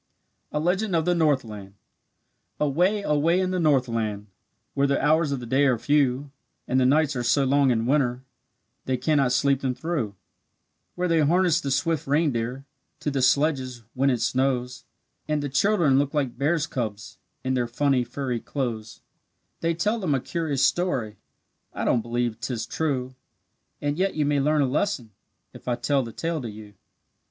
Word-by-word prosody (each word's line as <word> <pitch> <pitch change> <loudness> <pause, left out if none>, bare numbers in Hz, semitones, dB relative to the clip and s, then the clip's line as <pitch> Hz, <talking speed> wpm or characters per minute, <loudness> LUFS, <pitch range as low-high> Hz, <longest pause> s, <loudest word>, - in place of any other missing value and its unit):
A 150 - -1
LEGEND 185 +4 0
OF 160 -1 +1
THE 180 - +3
NORTHLAND 115 - -1 0.8
Away, 180 +8 +1
away 160 +3 +2
in 185 -1 0
the 185 - 0
Northland, 115 -9 +1 0.5
Where 140 0 +2
the 140 - +1
hours 155 +1 +2
of 140 - -1
the 120 - -7
day 135 +4 +2
are 125 -3 +2
few, 140 +1 +1 0.4
And 130 - +2
the 125 - +4
nights 150 +1 +2
are 125 - -1
so 125 +4 +2
long 140 0 +3
in 115 -2 +1
winter 130 -2 +1 0.6
They 130 -1 0
cannot 135 -1 +2
sleep 135 +1 +2
them 130 -2 -1
through; 140 -12 -3 0.8
Where 180 0 0
they 165 -2 +2
harness 170 +2 +3
the 140 - -3
swift 145 +3 0
reindeer 135 -3 0 0.4
To 145 - -1
the 135 -1 -1
sledges, 130 -2 +1
when 135 +2 +2
it 125 -3 0
snows; 125 0 -1 0.4
And 150 -1 0
the 145 - -2
children 155 -3 +3
look 145 +1 -1
like 135 -5 0
bears' 150 +4 +1
cubs 110 -7 -5 0.2
In 130 - 0
their 125 -2 0
funny, 130 +1 +1
furry 125 -2 -3
clothes; 115 -5 -4 0.6
They 165 0 0
tell 210 +7 0
them 165 -9 0
a - - +1
curious 150 -1 -1
story 130 - 0 0.6
I - - -2
don't 120 - +2
believe 120 0 -2
'tis 120 -1 -3
true; 130 -5 -2 0.7
And 145 +3 -2
yet 195 +1 +1
you 150 -2 +1
may 145 0 +2
learn 150 +1 +2
a - - +1
lesson 130 - -1 0.4
If - - -14
I 120 - +1
tell 135 +3 +1
the 115 -2 -6
tale 165 +4 -3
to 120 - -5
you. 105 -1 -11
140 Hz, 175 wpm, -25 LUFS, 125-155 Hz, 0.8 s, the